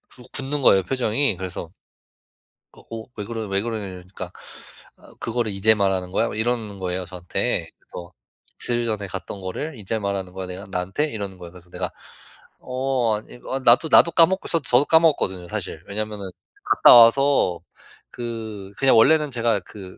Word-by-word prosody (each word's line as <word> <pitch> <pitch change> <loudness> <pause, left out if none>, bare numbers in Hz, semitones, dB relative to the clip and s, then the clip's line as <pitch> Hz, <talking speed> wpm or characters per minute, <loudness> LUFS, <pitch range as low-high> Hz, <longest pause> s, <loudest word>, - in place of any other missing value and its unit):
구 125 - -13
굳는 140 +2 -1
거예요, 95 -6 +5
표정이. 125 -2 0
그래서 90 -2 -6 1.0
"어 - - -17
어, 115 -1 -7
왜 105 - -3
그러 115 +1 -5
왜 100 0 +1
그러냐." 110 -3 -4
이러니까 90 0 -9 0.7
아 - - -18
"그거를 115 -1 -1
이제 110 +3 +5
말하는 95 -3 0
거야?" - - +1
막 - - -6
이러는 110 -4 -1
거예요, 90 0 -3
저한테. 90 0 -2
그래서 85 0 -11 0.5
"이틀 120 -1 -1
전에 105 -3 -3
갔던 95 +2 -7
거를 120 +9 -5
이제 110 +2 -3
말하는 100 -2 -4
거야. 95 -1 -6
내가 90 +2 -7
나한테?" 95 +12 -1
이러는 100 -4 -6
거예요. 85 -1 -11
그래서 90 -1 -16
내가 90 0 -4 0.7
"어, 125 -4 -1
아 - - -8
이 125 - -12 0.2
어 - - -1
나도 130 +5 +4
나도 170 - +7
까먹고" 180 +4 +3
저 165 - +2
저도 125 +1 +3
까먹었거든요, 145 - +2
사실. 80 -1 -6
왜냐면은 105 -1 -4 0.4
갔다 - - +7
와서 115 - +5 0.5
그 110 -4 -6
그냥 135 -3 +5
원래는 150 +5 +4
제가 115 -4 0
그 95 0 -11
105 Hz, 360 characters per minute, -22 LUFS, 95-125 Hz, 1.0 s, 나도